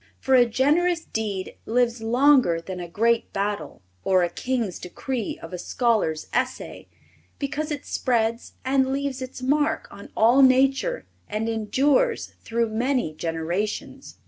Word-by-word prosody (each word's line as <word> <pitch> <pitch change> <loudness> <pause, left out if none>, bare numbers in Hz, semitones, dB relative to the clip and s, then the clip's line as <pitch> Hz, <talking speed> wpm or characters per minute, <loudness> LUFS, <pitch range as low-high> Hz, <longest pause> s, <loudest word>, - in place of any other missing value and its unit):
For 265 - 0
a 245 -2 +6
generous 325 +8 +2
deed 205 -4 -4
lives 235 0 +1
longer 245 - +4
than 180 +2 -7
a 175 - -5
great 230 +5 +1
battle 195 - -3 0.2
or 185 -1 +3
a 175 - -1
king's 235 -4 -2
decree 230 +5 -4
of 165 - -10
a 180 - -4
scholar's 215 -9 0
essay, 255 +1 -3 0.5
because 295 +2 -3
it 290 -2 -4
spreads 230 -2 -1
and 265 0 +2
leaves 275 -1 -2
its 255 0 -7
mark 295 +3 +1
on 200 - -11
all 240 +5 +5
nature 270 - +3 0.2
and 215 +2 -2
endures 275 - +1
through 230 0 0
many 240 - 0
generations. 165 +6 -4
235 Hz, 140 wpm, -24 LUFS, 205-270 Hz, 0.5 s, a